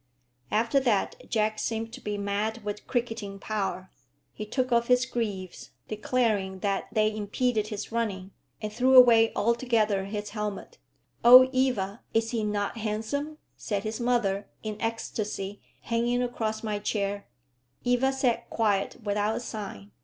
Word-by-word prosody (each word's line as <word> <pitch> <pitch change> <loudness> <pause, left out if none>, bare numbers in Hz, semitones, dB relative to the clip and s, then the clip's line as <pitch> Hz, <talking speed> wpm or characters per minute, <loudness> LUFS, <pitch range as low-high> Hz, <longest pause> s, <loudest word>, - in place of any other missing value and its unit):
After 230 +5 +2
that 260 - -1
Jack 215 -1 +1
seemed 225 +1 -3
to 260 - -8
be 210 0 -3
mad 205 +3 -2
with 210 0 -5
cricketing 225 -5 -2
power. 195 -3 -3 0.4
He 215 - -6
took 255 +3 -1
off 235 0 +3
his 250 0 +4
greaves, 205 -8 -4 0.2
declaring 215 -4 0
that 200 -1 -1
they 215 -1 +2
impeded 215 +1 0
his 210 0 -5
running, 200 -5 -2 0.3
and 210 0 -3
threw 255 +3 +3
away 235 -3 +8
altogether 220 -3 +1
his 205 +1 -5
helmet. 210 -2 -5 0.4
"Oh, 250 +2 +10
Eva, 240 -6 0
is 225 0 +2
he 230 -3 -1
not 210 +1 -2
handsome?" 225 +8 -3 0.2
said 205 -3 -3
his 215 +2 -4
mother, 235 -5 0
in 215 -1 -5
ecstasy, 210 -3 -3 0.2
hanging 240 +1 0
across 220 -3 -2
my 210 -2 -2
chair. 200 -1 -2 0.6
Eva 245 +2 +2
sat 265 -3 0
quiet 205 -3 0
without 210 +1 0
a - - -2
sign. 200 - -7
215 Hz, 145 wpm, -27 LUFS, 205-240 Hz, 0.6 s, Oh